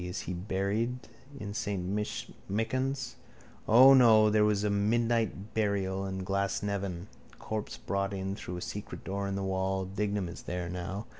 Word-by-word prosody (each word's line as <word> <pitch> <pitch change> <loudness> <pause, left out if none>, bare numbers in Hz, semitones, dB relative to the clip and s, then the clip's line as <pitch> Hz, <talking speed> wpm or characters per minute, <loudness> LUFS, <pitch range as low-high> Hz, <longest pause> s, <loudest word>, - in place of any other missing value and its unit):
Is 90 0 -4
he 90 - -4
buried 100 +7 -2 0.3
in 100 -3 -5
saint 100 -3 -2 0.6
Michan's? 130 +4 -1 0.5
Or 130 +4 +9
no, 110 -4 +7
there 105 0 +4
was 105 -1 +2
a 105 - +1
midnight 110 0 +1
burial 100 -3 0
in 95 -1 -4
Glasnevin. 100 -2 -1 0.3
Corpse 110 -1 -4
brought 100 0 -1
in 95 0 -3
through 90 -3 -6
a - - -6
secret 105 +3 -6
door 100 +1 -2
in 100 - -2
the 100 - -2
wall. 95 0 0
Dignam 100 0 -1
is 85 - -8
there 90 -1 -4
now. 90 +4 -4
100 Hz, 155 wpm, -30 LUFS, 95-110 Hz, 0.6 s, Or